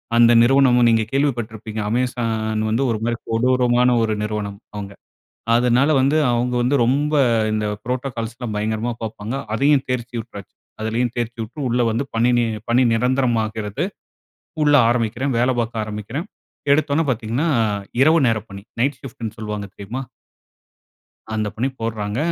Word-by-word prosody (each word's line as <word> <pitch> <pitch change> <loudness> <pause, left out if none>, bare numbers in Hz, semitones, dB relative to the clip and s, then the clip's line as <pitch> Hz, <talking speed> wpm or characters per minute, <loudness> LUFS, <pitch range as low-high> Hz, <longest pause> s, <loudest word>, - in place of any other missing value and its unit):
அந்த 120 0 +6
நிறுவனமும் 125 -1 +5
நீங்க 115 -1 +3
கேள்விப்பட்டிருப்பீங்க. 115 -6 -2
Amazon 115 -2 -1
வந்து, 115 +5 +1
ஒரு 110 - 0
மாரி 120 0 -1
கொடூரமான 125 +1 +3
ஒரு 110 -1 0
நிறுவனம், 105 -2 -4 0.2
அவுங்க. 100 -1 -6 0.6
அதனால 125 +4 +3
வந்து, 140 +4 +3
அவுங்க 120 +1 0
வந்து 130 +4 +2
ரொம்ப, 145 +5 +1 0.4
இந்த 105 0 -1 0.2
புரோட்டோகால்ஸ்லாம் 120 -2 -4
பயங்கரமா 110 +3 -1
பாப்பாங்க. 110 +2 -5 0.2
அதையும் 140 +2 +3
தேர்ச்சி 120 -1 -3
விட்டாச்சு. 105 -3 -10 0.3
அதிலயும் 115 +2 -1
தேர்ச்சி 120 0 -3
விட்டு, 110 +7 -10
உள்ள 120 +1 +1
வந்து, 115 +5 -1
பணி 120 +2 +3
நி 120 - +2 0.2
பணி 125 +2 +4
நிரந்தரமாகிறது. 115 - 0 0.8
உள்ள 145 0 +4 0.2
ஆரம்பிக்கிறேன். 120 +3 -1
வேல 125 +2 +3
பாக்க 115 0 -3
ஆரம்பிக்கிறேன். 105 - -5 0.5
எடுத்தவுடனே 150 +1 +2
பாத்தீங்கனா, 120 +5 -1 0.6
இரவு 160 +4 +5
நேர 115 -1 +1
பணி. 100 0 -9 0.2
நைட் 135 +2 +1
ஷிஃப்ட்னு 115 -4 -7
சொல்வாங்க. 105 -1 -4
தெரியுமா? 110 +6 -5 1.3
அந்த 110 -1 -1
பணி 125 +4 0
போடுறாங்க. 110 -1 -3
120 Hz, 135 wpm, -21 LUFS, 110-125 Hz, 1.3 s, அந்த